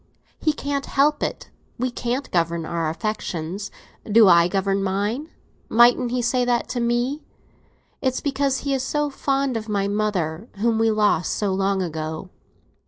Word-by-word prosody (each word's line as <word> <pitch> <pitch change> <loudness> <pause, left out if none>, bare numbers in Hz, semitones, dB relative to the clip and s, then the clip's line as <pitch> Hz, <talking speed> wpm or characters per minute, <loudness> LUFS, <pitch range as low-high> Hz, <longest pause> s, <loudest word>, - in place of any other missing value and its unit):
He 310 - +2
can't 280 -1 -3
help 295 +2 +2
it; - - -4 0.3
we 255 +1 -1
can't 245 +2 -3
govern 170 -1 0
our 165 -1 -1
affections. 190 0 -4 0.3
Do 220 0 +5
I 170 -1 +6
govern 195 +1 0
mine? 205 +10 -1 0.4
mightn't 240 +2 +5
he 245 0 -1
say 245 +1 +2
that 245 -1 +1
to 250 - -2
me? 240 +5 0 0.8
It's 260 -1 0
because 275 -1 0
he 280 -1 -1
is 265 - 0
so 295 +2 -1
fond 275 -1 0
of 220 -1 -4
my 200 -1 0
mother, 200 -3 -1
whom 225 +2 +1
we 225 0 +3
lost 210 -5 +2
so 200 -2 -1
long 195 0 +1
ago. 160 +1 -5
220 Hz, 160 wpm, -23 LUFS, 190-255 Hz, 0.8 s, I